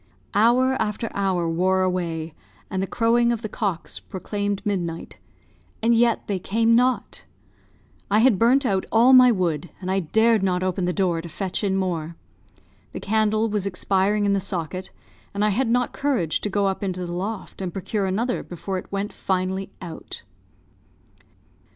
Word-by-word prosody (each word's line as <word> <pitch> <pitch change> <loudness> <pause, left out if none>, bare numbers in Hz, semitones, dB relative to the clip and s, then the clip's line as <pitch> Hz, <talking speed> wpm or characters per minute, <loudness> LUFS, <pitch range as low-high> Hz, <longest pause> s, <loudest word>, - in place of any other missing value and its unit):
Hour 250 +5 +3
after 215 +2 -2
hour 190 -4 0
wore 185 +3 +2
away, 170 -3 -2 0.4
and 190 - -1
the 195 - -1
crowing 235 +2 +2
of 235 -1 -3
the - - -2
cocks 200 -5 -3
proclaimed 205 +1 -4
midnight, 175 -5 -3 0.6
and 230 +1 +3
yet 235 0 +2
they 195 -2 -2
came 225 +5 +2
not. 250 +2 +1 0.8
I 205 - +3
had 225 -3 +4
burnt 255 +4 +4
out 195 -5 0
all 240 +4 +6
my 255 -1 +8
wood, 175 -6 -1
and 185 0 -3
I 195 - +2
dared 220 +5 +3
not 185 -1 0
open 185 0 -1
the 180 - +1
door 180 -3 0
to 170 - -9
fetch 190 +5 -3
in 195 -2 +1
more. 170 -4 -2 0.8
The - - -5
candle 215 +1 +1
was 205 -2 -1
expiring 195 +2 +1
in 200 - +2
the 200 - +2
socket, 185 -1 -4 0.5
and 205 +1 +1
I - - +3
had 225 +4 0
not 245 +1 +1
courage 250 - 0
to 210 - -2
go 200 0 +1
up 195 -1 -1
into 185 -2 -2
the 175 - -5
loft 195 +2 -5
and 185 -2 -3
procure 195 +1 -2
another 230 +6 -1
before 185 +2 -5
it - - -13
went 200 +1 -3
finally 190 +1 -2
out. 170 -2 -7
195 Hz, 170 wpm, -23 LUFS, 185-225 Hz, 0.8 s, my